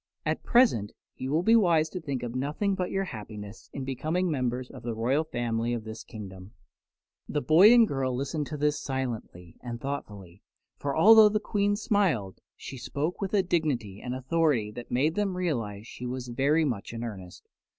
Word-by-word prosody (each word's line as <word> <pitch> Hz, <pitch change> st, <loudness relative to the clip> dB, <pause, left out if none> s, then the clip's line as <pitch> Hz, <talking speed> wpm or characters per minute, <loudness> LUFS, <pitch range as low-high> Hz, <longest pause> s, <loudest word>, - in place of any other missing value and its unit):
At -, -, -1 dB
present 230 Hz, -, +3 dB, 0.2 s
you 130 Hz, -, -5 dB
will 155 Hz, +4 st, +1 dB
be 225 Hz, +4 st, +5 dB
wise 170 Hz, -8 st, +4 dB
to 185 Hz, -, -6 dB
think 140 Hz, -5 st, -4 dB
of 120 Hz, -1 st, -4 dB
nothing 150 Hz, +10 st, -1 dB
but 185 Hz, -2 st, -2 dB
your 195 Hz, 0 st, -1 dB
happiness 105 Hz, -, -9 dB
in 140 Hz, -, -5 dB
becoming 155 Hz, +7 st, -1 dB
members 125 Hz, -2 st, -2 dB
of 130 Hz, -, -10 dB
the 115 Hz, -1 st, -4 dB
royal 130 Hz, +7 st, +1 dB
family 120 Hz, -5 st, -2 dB
of 115 Hz, -, -5 dB
this 110 Hz, 0 st, -8 dB
kingdom." 95 Hz, -2 st, -10 dB, 0.8 s
The 150 Hz, -, 0 dB
boy 165 Hz, -, +7 dB
and 235 Hz, -2 st, +7 dB
girl 130 Hz, -4 st, -1 dB
listened 140 Hz, +3 st, -2 dB
to 150 Hz, -, -5 dB
this 150 Hz, +1 st, 0 dB
silently 115 Hz, -10 st, -5 dB
and 120 Hz, -1 st, -6 dB
thoughtfully, 105 Hz, -10 st, -6 dB, 0.4 s
for 140 Hz, 0 st, -2 dB
although 215 Hz, +4 st, +8 dB
the 215 Hz, 0 st, 0 dB
Queen 205 Hz, -1 st, 0 dB
smiled, 185 Hz, -, 0 dB, 0.2 s
she 130 Hz, -1 st, -9 dB
spoke 140 Hz, -, -3 dB
with 195 Hz, +1 st, -1 dB
a 195 Hz, -, +4 dB
dignity 135 Hz, -, -1 dB
and 125 Hz, 0 st, -3 dB
authority 130 Hz, -5 st, +1 dB
that 120 Hz, +3 st, -9 dB
made 140 Hz, +6 st, +1 dB
them 195 Hz, -1 st, -1 dB
realize 115 Hz, -, -2 dB
she 125 Hz, +1 st, -7 dB
was 125 Hz, 0 st, -5 dB
very 140 Hz, +6 st, +2 dB
much 115 Hz, -6 st, -3 dB
in 115 Hz, 0 st, -5 dB
earnest. 95 Hz, -6 st, -8 dB
135 Hz, 185 wpm, -28 LUFS, 115-165 Hz, 0.8 s, although